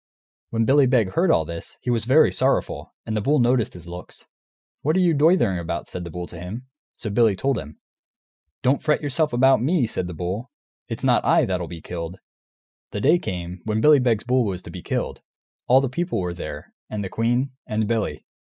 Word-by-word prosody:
When 115 Hz, 0 st, 0 dB
Billy 135 Hz, +2 st, +5 dB
Beg 115 Hz, -7 st, +2 dB
heard 175 Hz, -, +2 dB
all 80 Hz, -, +3 dB
this, 85 Hz, +1 st, -8 dB
he 125 Hz, -, -1 dB
was 115 Hz, -2 st, 0 dB
very 135 Hz, +6 st, +5 dB
sorrowful, -, -, -1 dB
and 110 Hz, -, -3 dB
the 105 Hz, -, 0 dB
bull 145 Hz, +8 st, +2 dB
noticed 120 Hz, -5 st, +2 dB
his 90 Hz, -, -11 dB
looks. 90 Hz, +1 st, -10 dB, 0.6 s
"What 155 Hz, +3 st, +1 dB
are -, -, +3 dB
you 175 Hz, -3 st, +4 dB
doitherin' 145 Hz, -, +3 dB
about?" 85 Hz, 0 st, -4 dB
said 90 Hz, -1 st, -6 dB
the -, -, -6 dB
bull 90 Hz, +2 st, -5 dB
to 85 Hz, -, -10 dB
him. 105 Hz, +9 st, -7 dB, 0.3 s
So 110 Hz, -, -4 dB
Billy 110 Hz, -1 st, +3 dB
told 135 Hz, +5 st, 0 dB
him. 75 Hz, +1 st, -10 dB, 0.9 s
"Don't 130 Hz, +2 st, +2 dB
fret 150 Hz, 0 st, +1 dB
yourself 150 Hz, +2 st, +1 dB
about 130 Hz, 0 st, +4 dB
me," 145 Hz, +1 st, +2 dB
said 95 Hz, -5 st, -3 dB
the 90 Hz, -, -7 dB
bull, 95 Hz, -, -4 dB, 0.4 s
"it's -, -, -6 dB
not -, -, +3 dB
I -, -, +4 dB
that'll 90 Hz, -2 st, -2 dB
be 85 Hz, -1 st, -8 dB
killed!" 85 Hz, +2 st, -6 dB, 0.7 s
The -, -, -4 dB
day 160 Hz, +8 st, +4 dB
came, 90 Hz, -, -5 dB
when 110 Hz, 0 st, 0 dB
Billy 150 Hz, +4 st, +6 dB
Beg's 115 Hz, -4 st, +1 dB
bull 125 Hz, +1 st, +2 dB
was 95 Hz, -4 st, -3 dB
to -, -, -9 dB
be -, -, -8 dB
killed; -, -, -3 dB, 0.5 s
all 130 Hz, +2 st, +6 dB
the 135 Hz, -, 0 dB
people 170 Hz, -, -2 dB
were 90 Hz, -1 st, -2 dB
there, 75 Hz, -4 st, -8 dB, 0.2 s
and 105 Hz, -1 st, -3 dB
the -, -, -3 dB
queen, 120 Hz, +6 st, 0 dB, 0.2 s
and 110 Hz, 0 st, -1 dB
Billy. 115 Hz, -2 st, -2 dB
115 Hz, 210 wpm, -23 LUFS, 90-135 Hz, 0.9 s, Billy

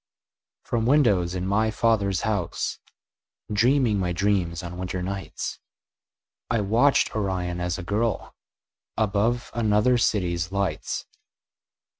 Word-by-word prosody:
From 115 Hz, -1 st, -1 dB
windows 100 Hz, -, +3 dB
in 90 Hz, 0 st, -2 dB
my 110 Hz, +3 st, +2 dB
father's 105 Hz, -5 st, +1 dB
house, 105 Hz, -6 st, -2 dB, 0.7 s
Dreaming 120 Hz, -1 st, +3 dB
my 90 Hz, -2 st, -1 dB
dreams 90 Hz, -3 st, 0 dB
on 90 Hz, +1 st, -7 dB
winter 90 Hz, 0 st, -3 dB
nights, 95 Hz, 0 st, -5 dB, 0.9 s
I 115 Hz, -2 st, +1 dB
watched 115 Hz, +8 st, +3 dB
Orion 90 Hz, -4 st, -2 dB
as 90 Hz, 0 st, -1 dB
a 95 Hz, -, -6 dB
girl 105 Hz, +4 st, -1 dB, 0.6 s
Above 110 Hz, +3 st, 0 dB
another 115 Hz, +2 st, +3 dB
city's 90 Hz, -5 st, 0 dB
lights. 100 Hz, -5 st, -2 dB
100 Hz, 110 wpm, -25 LUFS, 90-110 Hz, 0.9 s, windows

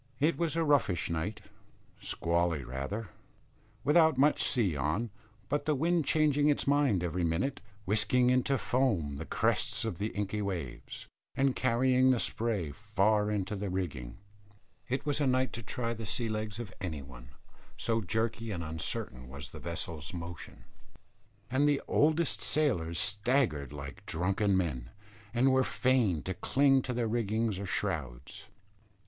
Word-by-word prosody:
It 155 Hz, +4 st, +3 dB
was 165 Hz, -2 st, -1 dB
a 165 Hz, -, +2 dB
roughish 140 Hz, -, +2 dB
night, 85 Hz, +6 st, -3 dB, 0.6 s
squally 85 Hz, -3 st, 0 dB
rather, 70 Hz, -, -4 dB, 0.7 s
without 160 Hz, 0 st, +5 dB
much 145 Hz, +3 st, +4 dB
sea 105 Hz, -, +1 dB
on, 75 Hz, -, -1 dB, 0.4 s
but 145 Hz, +4 st, -1 dB
the 150 Hz, -, +2 dB
wind 165 Hz, +2 st, +1 dB
changing 150 Hz, 0 st, +3 dB
its 145 Hz, -, +1 dB
mind 140 Hz, -10 st, +3 dB
every 90 Hz, +1 st, -1 dB
minute, 90 Hz, +12 st, -1 dB, 0.2 s
whisking 110 Hz, +5 st, +3 dB
into 130 Hz, +2 st, +2 dB
foam 105 Hz, -, 0 dB
the 80 Hz, -, -6 dB
crests -, -, +1 dB
of 85 Hz, -, -3 dB
the 105 Hz, -, 0 dB
inky 105 Hz, 0 st, -3 dB
waves, 85 Hz, -11 st, -5 dB, 0.3 s
and 135 Hz, -1 st, +2 dB
carrying 130 Hz, +1 st, +3 dB
the 130 Hz, -2 st, +3 dB
spray 110 Hz, -12 st, -1 dB
far 105 Hz, +2 st, +1 dB
into 105 Hz, 0 st, -1 dB
the 100 Hz, 0 st, -3 dB
rigging. 75 Hz, -10 st, -4 dB, 0.7 s
It 135 Hz, +3 st, -1 dB
was 145 Hz, 0 st, 0 dB
a 140 Hz, -, +3 dB
night 130 Hz, 0 st, +1 dB
to 115 Hz, -, -5 dB
try 115 Hz, +2 st, -3 dB
the 110 Hz, -2 st, -6 dB
sea 115 Hz, +2 st, 0 dB
legs 110 Hz, 0 st, -3 dB
of 105 Hz, -6 st, -6 dB
any 80 Hz, -6 st, -4 dB
one, -, -, -12 dB, 0.5 s
so 115 Hz, -1 st, 0 dB
jerky 110 Hz, +3 st, -1 dB
and 90 Hz, -5 st, -3 dB
uncertain 75 Hz, -5 st, -3 dB
was 70 Hz, +1 st, -8 dB
the -, -, -9 dB
vessel's 85 Hz, -2 st, -5 dB
motion; 85 Hz, 0 st, -8 dB, 0.8 s
and 140 Hz, +3 st, +2 dB
the 145 Hz, -1 st, +2 dB
oldest 155 Hz, +1 st, +2 dB
sailors 90 Hz, -, +1 dB
staggered 105 Hz, -, +1 dB
like 70 Hz, -2 st, -9 dB
drunken 95 Hz, +3 st, +1 dB
men, 65 Hz, -10 st, -2 dB, 0.4 s
and 125 Hz, +3 st, +3 dB
were 130 Hz, 0 st, +4 dB
fain 125 Hz, -, +2 dB
to 95 Hz, -, -3 dB
cling 135 Hz, +8 st, +3 dB
to 125 Hz, -, -3 dB
rigging 110 Hz, 0 st, 0 dB
or 100 Hz, -, -4 dB
shrouds. 65 Hz, -6 st, -3 dB
105 Hz, 150 wpm, -31 LUFS, 85-130 Hz, 0.8 s, without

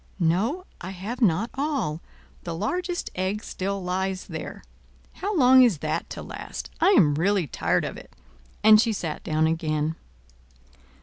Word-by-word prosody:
"No, 200 Hz, -, +1 dB, 0.2 s
I 180 Hz, -, -5 dB
have 200 Hz, +7 st, -6 dB
not 210 Hz, +2 st, +2 dB
all. 270 Hz, -, -2 dB, 0.4 s
The 170 Hz, -1 st, -5 dB
largest 350 Hz, -, -2 dB
egg 190 Hz, +3 st, -2 dB
still 195 Hz, 0 st, -3 dB
lies 190 Hz, +1 st, -2 dB
there. -, -, -7 dB, 0.5 s
How 405 Hz, -1 st, -3 dB
long 260 Hz, -2 st, +7 dB
is 235 Hz, -9 st, +5 dB
that 155 Hz, +1 st, -3 dB
to -, -, -7 dB
last? -, -, -7 dB
I -, -, +4 dB
am 150 Hz, -4 st, +5 dB
really 185 Hz, +4 st, +1 dB
tired 140 Hz, -, 0 dB
of -, -, -5 dB
it." -, -, -13 dB, 0.5 s
And 215 Hz, 0 st, +8 dB
she 230 Hz, -1 st, +1 dB
sat 165 Hz, -6 st, -4 dB
down 155 Hz, 0 st, +1 dB
again. 160 Hz, -1 st, 0 dB
190 Hz, 150 wpm, -25 LUFS, 165-235 Hz, 0.5 s, And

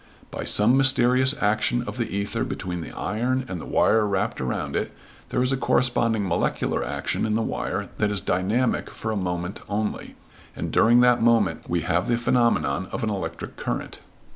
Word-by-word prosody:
By -, -, -5 dB
some 110 Hz, +5 st, +5 dB
mysterious 130 Hz, 0 st, +5 dB
action 110 Hz, +3 st, +1 dB
of 125 Hz, -, -7 dB
the 115 Hz, -, -2 dB
ether 100 Hz, +1 st, -2 dB
between 90 Hz, -2 st, -4 dB
the -, -, -8 dB
iron 125 Hz, +6 st, -2 dB
and 90 Hz, -5 st, -5 dB
the -, -, -9 dB
wire 110 Hz, -1 st, +3 dB
wrapped 95 Hz, -7 st, -1 dB
around 65 Hz, -, -3 dB
it -, -, -2 dB, 0.4 s
there 125 Hz, -, 0 dB
is 130 Hz, -, +2 dB
a 135 Hz, -, +1 dB
corresponding 115 Hz, -5 st, +1 dB
molecular 85 Hz, -, -1 dB
action -, -, -2 dB
in 110 Hz, -1 st, 0 dB
the 115 Hz, -, 0 dB
wire -, -, -3 dB
that 105 Hz, -, +2 dB
is 105 Hz, -1 st, 0 dB
dynamic 105 Hz, +9 st, 0 dB
for 110 Hz, -, -5 dB
a -, -, -2 dB
moment 90 Hz, -1 st, -3 dB
only, 105 Hz, +1 st, -3 dB, 0.4 s
and -, -, -4 dB
during 120 Hz, +2 st, +5 dB
that 125 Hz, -1 st, +4 dB
moment 115 Hz, -3 st, +2 dB
we 85 Hz, -1 st, 0 dB
have 90 Hz, +5 st, 0 dB
the 120 Hz, -1 st, +1 dB
phenomenon 115 Hz, -, +1 dB
of -, -, -4 dB
an 110 Hz, -, 0 dB
electric 85 Hz, -5 st, -5 dB
current. -, -, -4 dB
110 Hz, 185 wpm, -24 LUFS, 95-120 Hz, 0.4 s, some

